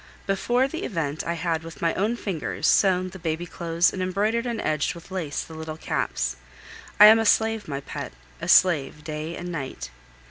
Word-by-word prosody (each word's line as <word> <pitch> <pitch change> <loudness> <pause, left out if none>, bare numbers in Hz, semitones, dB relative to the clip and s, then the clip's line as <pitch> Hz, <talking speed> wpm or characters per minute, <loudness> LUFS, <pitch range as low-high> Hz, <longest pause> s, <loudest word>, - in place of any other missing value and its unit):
Before 240 +7 +1
the 325 +5 -5
event 155 - -2
I 170 - 0
had 165 -1 -1
with 165 0 -10
my 165 -1 +1
own 215 +5 0
fingers 195 -9 -4
sewn 185 -2 +3
the 190 - -10
baby 160 +1 -2
clothes 170 0 +1
and 185 - -4
embroidered 210 +6 0
and 235 -2 -2
edged 155 +2 0
with 170 +3 -13
lace 170 -6 -3
the 160 - -12
little 160 0 -6
caps. - - -2 0.6
I 210 - +11
am 220 +1 +9
a - - +2
slave, 220 0 +2
my 140 -2 -4
pet, - - -6 0.3
a - - -4
slave 150 -5 +4
day 155 +1 -5
and 175 0 -6
night. 135 - -6
170 Hz, 190 wpm, -25 LUFS, 155-200 Hz, 0.6 s, I